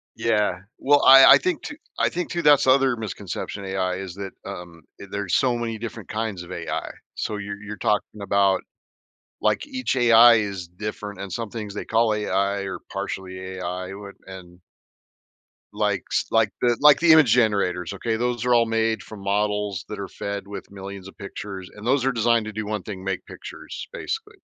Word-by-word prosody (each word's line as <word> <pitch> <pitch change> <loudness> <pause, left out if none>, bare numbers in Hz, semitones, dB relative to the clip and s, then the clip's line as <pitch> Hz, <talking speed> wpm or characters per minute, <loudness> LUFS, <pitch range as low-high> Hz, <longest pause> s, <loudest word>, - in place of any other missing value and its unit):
Yeah, 105 -5 +1 0.2
well, 145 +1 +3
I 135 0 +10
I - - +8
think 360 -3 -1
to 295 - -7 0.2
I - - +2
think, 180 0 -4
too, 170 - -2
that's 145 -3 +5
the 130 - +6
other 135 -1 +3
misconception 105 -1 -5
of 95 - -6
AI 95 -1 -1
is 95 -2 -7
that, 100 -1 -6
um, 90 -4 -9 0.2
eh, - - -7
there's 100 -2 -1
so 125 -2 +2
many 115 -1 -3
different 115 +1 -7
kinds 110 -4 -3
of 90 - -12
AI. 80 -3 -4 0.3
So 105 - -3
you're 100 0 -6
you're 105 0 -7
talking 105 +2 -1
about 100 -1 +2 0.8
like 105 - +1
each 260 - -2
AI 120 -1 +7
is 100 -5 -2
different 105 +2 -7
and 100 -1 -6
some 115 +3 -4
things 105 -2 -6
they 105 - -5
call 115 -1 +2
AI 100 -1 0
or 95 -2 -5
partially 95 -1 -5
AI 95 -1 -5
w 100 +1 -8 0.2
and 90 -2 -11 1.1
Like 105 -4 0
s - - +1
like - - +3
the 120 -1 +3
like 150 -1 +7
the 170 -1 +5
image 155 -7 +7
generators, 100 -6 +1
okay? 110 +3 -2
Those 120 0 -1
are 125 - +3
all 115 -1 +4
made 115 -2 0
from 110 - -11
models 100 -1 -1
that 105 - -6
are 100 - -4
fed 100 +1 -5
with 100 0 -8
millions 100 -1 -8
of 95 - -13
pictures, 100 -2 -7
and 105 +1 -11
those 130 +1 +2
are 135 - +3
designed 115 -1 +2
to 110 - -5
do 110 0 -4
one 105 -1 -3
thing: 95 -1 -8
make 95 -1 -3
pictures, - - -9
basically, 450 -3 -5
105 Hz, 195 wpm, -24 LUFS, 95-115 Hz, 1.1 s, I